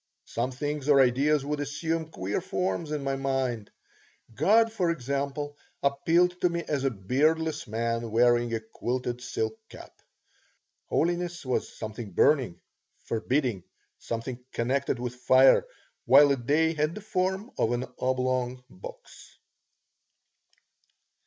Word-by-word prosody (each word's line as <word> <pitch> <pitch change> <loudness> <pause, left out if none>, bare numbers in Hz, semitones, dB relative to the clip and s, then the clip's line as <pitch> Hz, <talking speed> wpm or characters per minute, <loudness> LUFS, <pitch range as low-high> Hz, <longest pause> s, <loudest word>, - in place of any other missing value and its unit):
Some 120 +2 -2
things 145 +2 -3
or 140 -2 +6
ideas 135 +3 +3
would 150 0 -2
assume 160 +3 -2
queer 100 - -3
forms 185 -3 -2
in 150 -2 -2
my 135 0 -1
mind. 135 -5 -2 0.6
God, 225 - +4
for 185 -6 +1
example, 140 0 -2 0.3
appealed 170 +6 +2
to 180 - +4
me 170 0 -2
as 140 -3 -1
a 135 - +3
beardless 150 +9 0
man 115 +1 -2
wearing 120 +1 +3
a 115 -1 -1
quilted 120 +2 -3
silk 110 -3 -3
cap; - - -12 0.9
holiness 175 -1 -1
was 130 - -2
something 110 -2 -6
burning, 130 - +3 0.5
forbidding, 120 -2 0 0.4
something 120 +2 -5
connected 130 +2 0
with 120 0 -4
fire 130 - +5 0.4
while 145 -1 +7
a - - +4
day 150 +6 +1
had 155 +1 -1
the 215 - -7
form 190 +2 -1
of 115 - +2
an 120 +1 -1
oblong 130 -1 -1
box. 90 - -12
135 Hz, 125 wpm, -28 LUFS, 120-155 Hz, 0.9 s, while